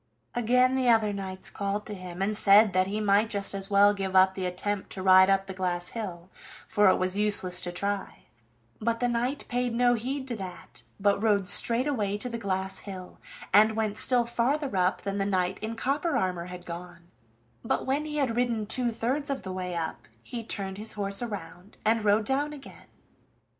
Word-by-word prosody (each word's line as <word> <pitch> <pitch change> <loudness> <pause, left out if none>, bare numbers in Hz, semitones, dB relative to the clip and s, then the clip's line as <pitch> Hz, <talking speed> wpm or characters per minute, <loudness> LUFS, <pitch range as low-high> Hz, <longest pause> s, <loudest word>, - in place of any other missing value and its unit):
Again 250 +2 +3
the 255 -2 +2
other 220 -3 +3
knights 190 -1 -6
called 200 +1 -3
to 210 - -6
him, 185 -1 -5
and 210 +2 0
said 205 0 +5
that 185 0 +2
he 205 +2 -2
might 210 +1 +3
just 200 -2 -3
as 195 0 -4
well 205 0 +5
give 195 -2 -4
up 190 0 +6
the 190 -1 -3
attempt 195 +2 -3
to 190 - -5
ride 190 0 +7
up 195 0 +2
the 195 - -7
glass 180 -1 -1
hill, 185 -5 -6 0.4
for 210 -3 +4
it - - +4
was 185 +1 -1
useless 200 -3 +1
to 175 - -3
try; 200 +2 -4 0.6
but 230 +1 -1
the 245 - +1
knight 245 +4 -1
paid 245 -1 -1
no 245 0 +4
heed 260 +4 -3
to 240 - -2
that, 185 -3 -9 0.2
but 200 0 +2
rode 205 -4 +2
straight 235 +5 +2
away 210 -9 -1
to 250 +4 -2
the 230 -1 -5
glass 190 -2 -2
hill, 185 -3 -9 0.3
and 215 +2 +6
went 215 -2 -1
still 245 -2 +3
farther 255 +2 -1
up 180 0 +1
than 200 0 -2
the - - +2
knight 185 -1 0
in 220 +1 -4
copper 280 +6 0
armor 180 -2 -1
had 180 0 -9
gone; 175 0 -9 0.5
but - - -1
when 280 +3 0
he 300 -1 -4
had 260 -6 0
ridden 235 -3 0
two 240 +3 0
thirds 260 +6 -2
of 275 -6 -3
the 190 0 -5
way 180 -1 -4
up 160 -9 -4 0.2
he 235 -2 -6
turned 195 -3 -4
his 220 +1 -2
horse 200 0 0
around, 190 -4 -7
and 225 0 +2
rode 210 +1 +3
down 285 +4 -1
again. 280 -2 -12
205 Hz, 205 wpm, -27 LUFS, 190-235 Hz, 0.6 s, ride